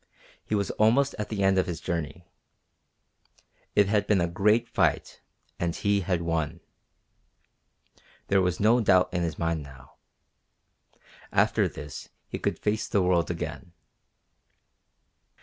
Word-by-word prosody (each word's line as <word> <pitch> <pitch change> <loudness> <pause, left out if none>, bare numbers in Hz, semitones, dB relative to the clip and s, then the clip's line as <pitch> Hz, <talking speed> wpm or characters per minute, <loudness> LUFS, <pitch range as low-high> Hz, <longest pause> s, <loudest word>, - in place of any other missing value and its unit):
He 105 - -2
was 100 -2 -1
almost 130 +6 +4
at 105 - -3
the 100 -3 -2
end 95 0 +4
of 95 - 0
his 85 -2 -4
journey. 85 0 -4 1.5
It 105 -1 +5
had 105 0 +1
been 105 -3 +3
a 85 - +2
great 105 +7 +2
fight, 120 - 0 0.4
and 85 -1 -1
he 100 0 +1
had 90 -2 -1
won. 80 -3 -2 1.7
There 95 -1 +2
was 90 -1 0
no 110 +4 +4
doubt 95 -5 +3
in 90 - 0
his 80 -3 -2
mind 85 -1 -1
now. 70 -2 -14 1.3
After - - +2
this 75 -1 -9 0.2
he - - -5
could - - -1
face 110 +1 -1
the 100 - +1
world 90 -2 +2
again. 85 +1 -5
90 Hz, 135 wpm, -27 LUFS, 85-105 Hz, 1.7 s, It